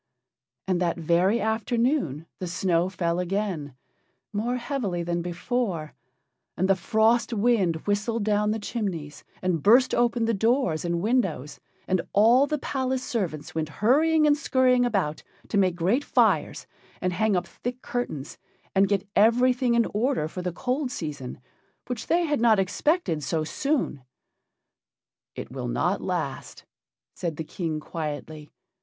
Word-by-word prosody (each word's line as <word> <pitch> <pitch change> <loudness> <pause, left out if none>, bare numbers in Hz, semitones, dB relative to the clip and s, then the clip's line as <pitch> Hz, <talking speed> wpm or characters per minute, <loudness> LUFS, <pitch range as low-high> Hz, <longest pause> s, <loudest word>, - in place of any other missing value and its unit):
And 185 -1 +1
that 175 -1 0
very 175 +7 +2
afternoon 220 - 0
the 185 - -4
snow 175 0 +1
fell 170 -2 -1
again, 180 -7 -2 0.6
more 230 +4 -1
heavily 235 -9 -2
than 170 0 -1
before, 175 -2 -2 0.6
and 185 - +1
the 195 - +4
frost 220 +5 +2
wind 210 -6 +2
whistled 210 +2 0
down 210 0 +1
the 215 - 0
chimneys 195 -9 -4 0.2
and 180 -4 0
burst 245 - +5
open 240 -1 +2
the 230 - +1
doors 225 - +1
and 170 -1 -1
windows, 190 - 0 0.3
and 185 -2 +1
all 235 +7 +5
the 300 - -1
palace 260 -2 -2
servants 175 -10 -3
went 160 -1 -2
hurrying 305 - +3
and 295 -1 +5
scurrying 255 -4 +3
about 190 -10 -1 0.3
to 205 - 0
make 185 -3 +2
great 190 +11 +1
fires - - +1 0.3
and 180 0 -1
hang 215 +2 +1
up 175 -1 0
thick 245 +5 -6
curtains 155 - -4 0.3
and 195 0 +3
get 200 -1 0
everything 245 +2 +4
in 235 -1 +4
order 235 - +1
for 180 +3 -6
the 180 0 -2
cold 255 - -2
season, 150 - -6 0.5
which 245 -3 -5
they 345 +1 +2
had 295 -5 0
not 225 -2 +5
expected 195 - 0
so 155 +3 -1
soon. 265 - -1 1.3
"It - - -7
will - - -4
not - - 0
last," - - -4 0.5
said 170 -3 -4
the 160 - -3
King, 160 -1 -3
quietly. 150 -1 -6
205 Hz, 145 wpm, -26 LUFS, 170-245 Hz, 1.3 s, burst